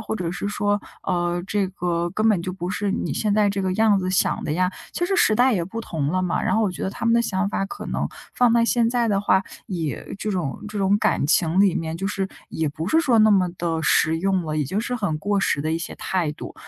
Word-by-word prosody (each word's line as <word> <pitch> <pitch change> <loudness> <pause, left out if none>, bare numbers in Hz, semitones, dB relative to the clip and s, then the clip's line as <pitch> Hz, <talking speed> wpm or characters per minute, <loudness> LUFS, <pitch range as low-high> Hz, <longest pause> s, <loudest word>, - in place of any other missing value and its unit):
或 220 - -4
者 175 -4 -3
是 200 - -3
说， 205 0 0 0.2
呃， 175 0 -1
这 200 -2 0
个 175 -2 -2
根 215 +5 0
本 210 -6 +3
就 185 - -3
不 180 -1 -5
是 200 +2 -1
你 - - -2
现 210 -2 0
在 210 -1 +3
这 200 0 -2
个 190 -1 0
样 215 -1 +4
子 185 0 -2
想 185 +1 +1
的 - - -3
呀。 180 +2 +1 0.2
其 350 - 0
实 390 +2 0
时 220 - +4
代 250 +3 +4
也 180 -5 +1
不 190 +7 -6
同 155 -9 -3
了 185 +3 0
嘛， 180 - 0
然 190 - +1
后 225 - +3
我 205 - +1
觉 180 - -7
得 - - 0
他 195 - -6
们 230 - +3
的 235 - +4
想 200 -4 0
法 195 - -1
可 - - -8
能 - - -2 0.3
放 245 -1 +4
在 230 0 +4
现 235 -1 +2
在 240 -1 +1
的 200 -1 +2
话， 190 -1 +3 0.2
也 165 -3 -4
这 215 - -2
种 175 -8 -2
这 210 -1 -5
种 195 +1 +3
感 175 - +1
情 165 +3 +3
里 195 -3 +4
面 160 0 -3
就 195 +4 -3
是 195 -1 -1 0.2
也 160 - -2
不 155 +4 -3
是 320 - +3
说 255 -9 +3
那 215 0 +6
么 190 -3 +4
地 165 -2 -1
实 160 +1 +3
用 190 0 +1
了， 155 0 -2
已 150 - +1
经 195 +10 -2
是 250 +2 -3
很 180 -9 -1
过 205 +4 0
时 190 - +1
的 155 +2 -2
一 160 - +1
些 165 - -6
态 175 -5 -1
度。 - - -9
190 Hz, 290 characters per minute, -23 LUFS, 170-210 Hz, 0.3 s, 那